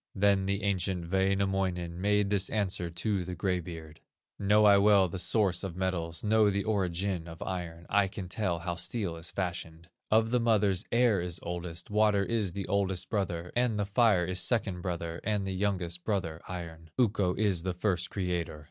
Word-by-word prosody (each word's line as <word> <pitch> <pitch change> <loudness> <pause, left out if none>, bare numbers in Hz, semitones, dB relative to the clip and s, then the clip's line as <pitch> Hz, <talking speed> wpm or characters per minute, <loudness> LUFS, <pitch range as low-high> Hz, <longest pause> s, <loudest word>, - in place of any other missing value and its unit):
Then 100 -1 +3
the 100 0 -1
ancient 95 -3 -1
Wainamoinen 95 -3 0
Made 105 0 +2
this 100 -2 +2
answer 95 -5 -1
to 95 +3 -1
the 90 +1 -5
gray 90 -2 0
beard: 80 -2 -9 0.4
"Know 105 +1 +4
I 100 -1 +7
well 100 -2 +5
the 90 +2 -5
source 95 0 +1
of 95 -4 -5
metals, 85 -3 -2
Know 110 0 +4
the 100 0 0
origin 95 -3 -1
of 80 0 -9
iron; 85 -2 -5
I 100 -1 +3
can 95 -1 -7
tell 95 -2 -1
bow 85 - -1
steel 85 +1 -2
is 85 +1 -5
fashioned. 85 -3 -5 0.2
Of 110 +1 +3
the 125 - +3
mothers 105 -3 +2
air 115 -5 +3
is 90 0 -3
oldest, 85 +1 -5
Water 105 -2 +3
is 105 -6 -1
the 100 0 -4
oldest 95 -2 0
brother, 90 -5 -2
And 120 -3 +2
the 105 - 0
fire 100 -3 +3
is 90 +1 -2
second 100 -7 0
brother, 85 -2 -4
And 105 -1 0
the 95 - -2
youngest 90 -3 -2
brother, 85 -6 -2
iron; 85 -3 -7
Ukko 100 -7 +2
is 100 -5 +1
the 90 +1 -2
first 90 -1 -1
creator. 90 -5 -2
95 Hz, 185 wpm, -30 LUFS, 85-100 Hz, 0.4 s, I